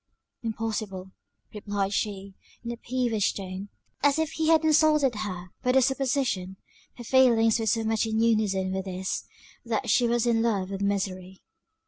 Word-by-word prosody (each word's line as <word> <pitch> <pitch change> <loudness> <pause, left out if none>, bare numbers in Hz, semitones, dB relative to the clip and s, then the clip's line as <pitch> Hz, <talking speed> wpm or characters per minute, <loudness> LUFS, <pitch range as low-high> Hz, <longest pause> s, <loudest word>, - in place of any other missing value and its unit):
"Impossible," 215 -4 -4 0.4
replied 205 -1 -2
she, 200 -1 -3 0.3
in 235 - -4
a 235 - -6
peevish 235 -4 0
tone, 190 +1 -6 0.3
as 285 +1 +3
if 320 0 0
he 320 -1 -1
had 320 -1 +5
insulted 305 -4 +4
her 185 -4 -5
by 250 - +2
the 265 - +6
supposition; 255 -8 -1 0.4
her 240 - -8
feelings 235 -3 +4
were 225 - -2
so 225 +2 +2
much 220 0 0
in 220 0 -1
unison 210 -5 +1
with 190 0 -3
his, 185 0 -3 0.4
that - - -1
she 245 - +4
was 235 0 +1
in 230 -1 +2
love 200 -5 0
with 195 0 -4
misery. 190 -2 -3
220 Hz, 160 wpm, -27 LUFS, 195-245 Hz, 0.4 s, the